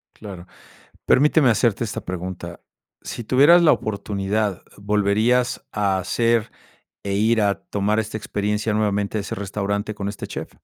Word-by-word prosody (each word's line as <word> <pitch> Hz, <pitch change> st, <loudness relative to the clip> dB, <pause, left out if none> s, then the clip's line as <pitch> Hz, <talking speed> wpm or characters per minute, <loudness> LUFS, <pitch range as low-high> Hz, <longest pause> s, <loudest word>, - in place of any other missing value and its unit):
Claro. 95 Hz, -4 st, -10 dB, 0.6 s
Permíteme 145 Hz, -1 st, +4 dB
hacerte 115 Hz, 0 st, +1 dB
esta 110 Hz, -1 st, -5 dB
pregunta. 90 Hz, -1 st, -6 dB, 0.4 s
Si 120 Hz, -, -6 dB
tuvieras 145 Hz, +9 st, +6 dB
la 165 Hz, -, +6 dB
oportunidad, 100 Hz, -1 st, -2 dB, 0.2 s
¿volverías 105 Hz, +5 st, +1 dB
a 100 Hz, -2 st, +1 dB
hacer 115 Hz, +4 st, 0 dB, 0.5 s
e 100 Hz, -, -2 dB
ir 110 Hz, +2 st, +2 dB
a 100 Hz, -1 st, 0 dB
tomar 105 Hz, +2 st, -1 dB
esta 110 Hz, 0 st, -3 dB
experiencia 105 Hz, +1 st, -2 dB
nuevamente, 105 Hz, 0 st, 0 dB
a -, -, -1 dB
ese 100 Hz, -, -5 dB
restaurante 100 Hz, +1 st, -3 dB
con 100 Hz, -1 st, -3 dB
este 100 Hz, -, -7 dB
chef? -, -, -6 dB
105 Hz, 140 wpm, -22 LUFS, 100-115 Hz, 0.6 s, tuvieras